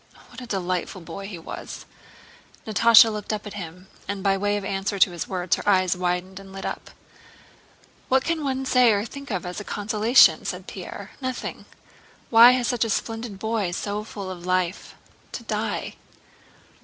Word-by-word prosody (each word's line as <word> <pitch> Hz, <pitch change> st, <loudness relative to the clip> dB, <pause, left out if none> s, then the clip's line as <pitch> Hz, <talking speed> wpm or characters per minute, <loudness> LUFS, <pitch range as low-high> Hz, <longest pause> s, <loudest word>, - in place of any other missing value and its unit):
What -, -, -11 dB
a 250 Hz, -, -8 dB
delightful 185 Hz, -2 st, -3 dB
boy 175 Hz, +4 st, -8 dB
he 195 Hz, -4 st, -7 dB
was!" 165 Hz, -, -8 dB, 0.8 s
Natásha 225 Hz, +1 st, +6 dB
looked 210 Hz, 0 st, -4 dB
at 210 Hz, -1 st, -4 dB
him, 180 Hz, -1 st, -8 dB, 0.2 s
and 200 Hz, -1 st, -4 dB
by 195 Hz, -1 st, +3 dB
way 205 Hz, +1 st, 0 dB
of 200 Hz, -, -5 dB
answer 195 Hz, +1 st, -2 dB
to 190 Hz, -, +5 dB
his 175 Hz, -, -5 dB
words 180 Hz, -2 st, 0 dB
her -, -, -1 dB
eyes 185 Hz, -2 st, +3 dB
widened 180 Hz, +1 st, -2 dB
and 195 Hz, -1 st, -13 dB
lit 195 Hz, 0 st, -7 dB
up. -, -, -5 dB, 1.2 s
"What 265 Hz, 0 st, +3 dB
can 335 Hz, -2 st, -1 dB
one 265 Hz, -1 st, -2 dB
say 250 Hz, -3 st, +5 dB
or 205 Hz, +1 st, 0 dB
think 280 Hz, +3 st, -9 dB
of 185 Hz, -6 st, -3 dB
as 180 Hz, +2 st, -5 dB
a -, -, -6 dB
consolation?" 215 Hz, +4 st, +4 dB
said -, -, -5 dB
Pierre. -, -, -8 dB
"Nothing! 255 Hz, -1 st, -5 dB, 0.7 s
Why 235 Hz, +2 st, +9 dB
had 250 Hz, -1 st, 0 dB
such 240 Hz, -1 st, +1 dB
a 225 Hz, -, -2 dB
splendid 225 Hz, 0 st, -3 dB
boy, 220 Hz, -2 st, -1 dB
so 205 Hz, +3 st, -3 dB
full 200 Hz, -3 st, -7 dB
of 175 Hz, -2 st, -9 dB
life, 185 Hz, 0 st, -1 dB, 0.4 s
to -, -, -6 dB
die?" -, -, -3 dB
205 Hz, 175 wpm, -24 LUFS, 185-225 Hz, 1.2 s, Why